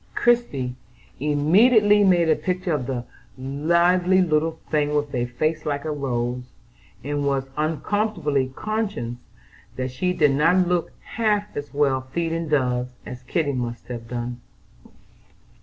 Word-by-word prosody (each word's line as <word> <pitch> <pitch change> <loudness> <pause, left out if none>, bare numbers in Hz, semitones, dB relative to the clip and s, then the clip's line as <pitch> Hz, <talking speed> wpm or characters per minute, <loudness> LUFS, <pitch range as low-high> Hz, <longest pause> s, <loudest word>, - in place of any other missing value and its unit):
Christie 190 - +1 0.5
immediately 205 - +4
made 175 -4 +4
a 155 - +4
picture 180 -2 -2
of 130 -5 -2
the 125 -2 -3 0.3
"lively 170 +7 +2
little 160 -2 +1
thing" 150 -1 +1
with 145 -1 -1
a 120 -1 0
face 155 +6 -1
"like 145 -1 -2
a 155 - -1
rose," 125 -3 -3 0.5
and 145 +1 -2
was 135 -1 -1
uncomfortably 155 -3 0
conscious 210 - -3 0.6
that 130 0 -3
she 180 +8 -1
did 150 -5 +3
not 165 +6 +3
look 175 -1 0
half 210 -2 -1
as 145 0 -5
well 140 -2 +1
feeding 165 +5 -3
doves 125 -3 0
as 125 0 -8
Kitty 145 +2 -1
must 120 -2 -4
have 115 -2 -6
done. 120 0 -5
150 Hz, 135 wpm, -23 LUFS, 130-175 Hz, 0.6 s, immediately